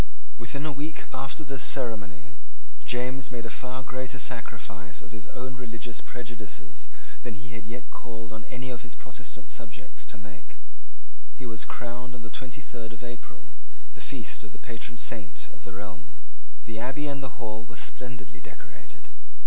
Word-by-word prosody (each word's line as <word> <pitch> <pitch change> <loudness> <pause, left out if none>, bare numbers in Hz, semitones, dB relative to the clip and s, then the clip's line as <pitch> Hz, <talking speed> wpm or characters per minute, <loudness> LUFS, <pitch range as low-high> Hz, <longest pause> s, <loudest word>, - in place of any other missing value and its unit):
Within 140 +5 +2
a 155 - +6
week 150 +3 +2
after 135 +4 +3
this 135 -1 +2
ceremony 105 - +4 0.5
James 130 +2 +5
made 120 -2 +1
a 115 - +1
far 130 +2 +1
greater 130 +1 +2
sacrifice 110 -6 0
of 115 - -8
his 105 -2 -3
own 130 0 0
religious 115 -1 -1
prejudices 120 -5 -2 0.3
than 120 -3 0
he 120 +3 -4
had 105 -2 -2
yet 120 +2 -2
called 115 -2 -2
on 110 - -1
any 130 +1 +1
of 120 - -1
his 120 -2 -4
Protestant 125 +1 -3
subjects 100 -7 -3
to - - -2
make. 100 -3 -8 0.8
He 130 - -2
was 110 -3 +2
crowned 125 +1 0
on 115 - -5
the 110 - -3
twenty 130 +2 0
third 115 -3 -2
of 105 - -8
April, 120 0 -5 0.4
the - - -7
feast - - +1
of 105 -2 -6
the - - -6
patron 120 0 0
saint 110 - +1
of 100 - -11
the - - -3
realm. 90 -9 -3 0.6
The 110 0 +1
Abbey 135 +4 +4
and 140 -1 +4
the 130 -2 0
Hall 110 -2 +1
were 115 - -4
splendidly 115 -15 0
decorated. - - -9
120 Hz, 175 wpm, -35 LUFS, 110-125 Hz, 0.8 s, a